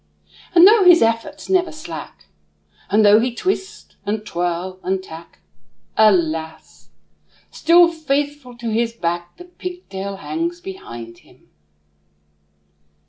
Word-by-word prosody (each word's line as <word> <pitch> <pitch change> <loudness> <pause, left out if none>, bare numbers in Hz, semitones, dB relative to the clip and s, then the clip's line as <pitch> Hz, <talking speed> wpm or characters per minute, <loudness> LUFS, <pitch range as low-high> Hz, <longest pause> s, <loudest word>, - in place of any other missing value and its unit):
And 345 +1 +9
though 430 -1 +6
his 355 -5 +7
efforts 230 +6 -2
never 365 -2 +1
slack, 160 - -9 0.6
And 215 +1 +4
though 205 +1 +7
he 240 +1 -1
twist, 385 +4 -4
and 210 +1 -3
twirl, 175 +1 -3
and 190 +1 -2
tack, 165 -1 -12 0.5
Alas! 160 - 0 0.6
still 340 +1 +5
faithful 290 -5 -3
to 235 -1 -4
his 230 +1 0
back 175 -4 -4
The 355 - -11
pigtail 355 - -7
hangs 335 - -4
behind 120 - -9
him. - - -25
225 Hz, 115 wpm, -20 LUFS, -, 0.6 s, And